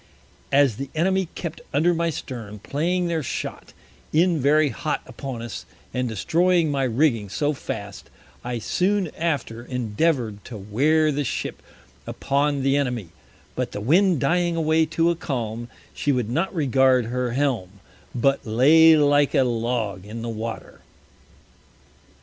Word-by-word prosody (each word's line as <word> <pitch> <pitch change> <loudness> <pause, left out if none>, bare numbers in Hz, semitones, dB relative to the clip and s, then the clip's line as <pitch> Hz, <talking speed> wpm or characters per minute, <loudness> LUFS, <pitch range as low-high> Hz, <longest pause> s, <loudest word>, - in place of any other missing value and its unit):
As 140 -6 +4
the 140 +1 -5
Enemy 190 +3 +1
kept 170 -2 -6
under 170 +5 +3
my 170 0 0
Stern, 115 -8 -6
playing 170 - -1
their 165 -2 -1
Shot - - -5 0.4
in 170 +1 +3
very 145 +2 +3
hot 150 +3 -3
upon 130 -5 -7
us, 120 - -6 0.3
and 125 -1 -1
destroying 165 - +2
my 135 -1 0
Rigging 115 -4 +1
so 145 +9 0
fast, 135 - -7 0.3
I 125 0 -3
soon 185 - 0
after 140 -8 -2
endeavour'd 120 -2 -1
to 120 - -8
wear 145 +10 +2
the 145 0 -1
Ship 130 - -4 0.5
upon 140 0 0
the 135 +1 +3
Enemy; 125 -10 -2 0.5
but - - -3
the - - -4
Wind 170 - +3
dying 175 +4 +1
away 160 0 +2
to 165 +2 +2
a - - -1
Calm, 120 -8 -4 0.3
she 145 - 0
would 125 -4 -1
not 165 +9 0
regard 130 - +3
her 125 +1 -2
Helm, 125 -9 -1 0.4
but 135 +3 +2
lay 155 +8 +6
like 145 0 +3
a 135 - +5
Log 115 -5 -2
in 110 +3 -7
the 120 - -4
Water. 115 0 -6
140 Hz, 145 wpm, -23 LUFS, 120-160 Hz, 0.5 s, lay